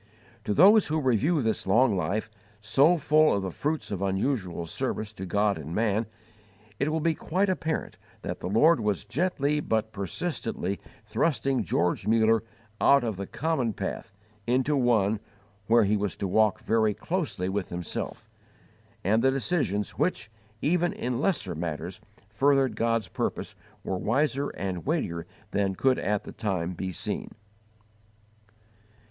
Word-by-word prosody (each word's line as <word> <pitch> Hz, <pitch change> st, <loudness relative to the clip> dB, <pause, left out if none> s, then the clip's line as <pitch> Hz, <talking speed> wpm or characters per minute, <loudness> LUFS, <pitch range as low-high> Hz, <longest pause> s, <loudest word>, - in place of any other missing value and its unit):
To 105 Hz, -, 0 dB
those 205 Hz, +5 st, +7 dB
who 155 Hz, +1 st, 0 dB
review 140 Hz, -, +2 dB
this 110 Hz, -3 st, -1 dB
long 115 Hz, +2 st, +4 dB
life, 100 Hz, +5 st, -2 dB, 0.3 s
so 135 Hz, +11 st, +4 dB
full 155 Hz, -1 st, +4 dB
of 100 Hz, -, -1 dB
the 95 Hz, -, -3 dB
fruits 150 Hz, -, -2 dB
of 100 Hz, -2 st, -3 dB
unusual 95 Hz, -3 st, -1 dB
service 105 Hz, +6 st, -3 dB
to 95 Hz, -2 st, -7 dB
God 100 Hz, -1 st, +1 dB
and 80 Hz, +3 st, -6 dB
man, 110 Hz, 0 st, +1 dB, 0.7 s
it 140 Hz, +3 st, +1 dB
will 160 Hz, 0 st, 0 dB
be 165 Hz, +1 st, +2 dB
quite 190 Hz, +5 st, 0 dB
apparent 165 Hz, -4 st, -2 dB, 0.2 s
that -, -, -4 dB
the -, -, -4 dB
Lord 145 Hz, -, +5 dB
was 105 Hz, -4 st, -1 dB
gently 150 Hz, +1 st, 0 dB
but 110 Hz, -5 st, -1 dB
persistently 100 Hz, -, -3 dB, 0.3 s
thrusting 130 Hz, +1 st, 0 dB
George 90 Hz, +1 st, 0 dB
Muller 110 Hz, 0 st, +4 dB, 0.4 s
out 140 Hz, -2 st, +5 dB
of 110 Hz, -3 st, -2 dB
the 100 Hz, +1 st, -5 dB
common 145 Hz, -8 st, -1 dB
path 100 Hz, +3 st, -5 dB, 0.4 s
into 130 Hz, +4 st, +2 dB
one 110 Hz, -5 st, +2 dB, 0.5 s
where 115 Hz, 0 st, +5 dB
he 105 Hz, +1 st, +2 dB
was 100 Hz, -4 st, -1 dB
to 100 Hz, -, -3 dB
walk 110 Hz, +2 st, +3 dB
very 110 Hz, -2 st, +2 dB
closely 160 Hz, -, -2 dB
with 95 Hz, -1 st, -2 dB
Himself; 90 Hz, +5 st, -5 dB, 0.8 s
and 110 Hz, +4 st, +3 dB
the 135 Hz, -, +4 dB
decisions 135 Hz, -, -1 dB
which, 110 Hz, -11 st, 0 dB, 0.3 s
even 175 Hz, +3 st, +2 dB
in 125 Hz, +1 st, -2 dB
lesser 160 Hz, -, 0 dB
matters 85 Hz, +2 st, -5 dB, 0.3 s
furthered 135 Hz, +2 st, +2 dB
God's 115 Hz, -2 st, 0 dB
purpose -, -, -3 dB, 0.3 s
were 95 Hz, -, -2 dB
wiser 140 Hz, +5 st, +1 dB
and 95 Hz, -3 st, -4 dB
weightier 90 Hz, -, -2 dB, 0.2 s
than 100 Hz, -1 st, 0 dB
could 130 Hz, +5 st, +2 dB
at 105 Hz, +1 st, 0 dB
the -, -, -9 dB
time 95 Hz, -5 st, -2 dB
be 95 Hz, +2 st, -4 dB
seen. 85 Hz, -, -3 dB
110 Hz, 150 wpm, -27 LUFS, 100-140 Hz, 0.8 s, those